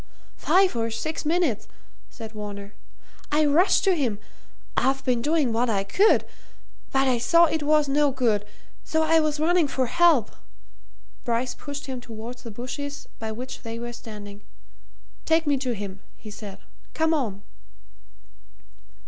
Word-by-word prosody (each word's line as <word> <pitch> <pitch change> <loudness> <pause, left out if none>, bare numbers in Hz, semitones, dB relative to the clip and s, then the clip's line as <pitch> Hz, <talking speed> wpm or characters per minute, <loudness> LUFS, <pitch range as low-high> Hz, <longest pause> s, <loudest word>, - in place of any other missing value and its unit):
"Five 380 -3 +3
or 230 -1 0
six 230 +9 -4
minutes," 320 - +1 0.4
said 225 -3 -9
Varner. 205 -1 -7 0.6
"I 305 +1 +3
rushed 315 +7 +4
to 385 -2 +4
him 250 -10 0 0.6
I've 270 +1 +1
been 245 -2 +1
doing 295 -4 +1
what 240 +2 +1
I 200 -3 +1
could. 395 - +3 0.7
But 270 0 +2
I 250 -2 +2
saw 335 +8 +5
it 320 -1 -1
was 300 0 +3
no 290 +1 +3
good, 235 -6 +1 0.4
so 315 0 +1
I 325 +1 +4
was 305 -1 0
running 335 0 +3
for 265 -1 0
help 325 -4 +3 0.4
" - - -34
Bryce 240 +1 -1
pushed 285 -1 -7
him 260 -3 -5
towards 235 +1 -8
the 240 - -8
bushes 280 +6 -6
by 220 0 -4
which 250 +4 -7
they 230 -1 -6
were 240 0 -5
standing. 210 -3 -9 0.8
"Take 325 0 +3
me 290 -1 +3
to 255 -3 -2
him," 195 -2 -6 0.2
he 215 - -11
said. 200 -2 -8 0.4
"Come 320 0 +2
on!" 215 -10 -2
255 Hz, 155 wpm, -25 LUFS, 225-310 Hz, 0.8 s, saw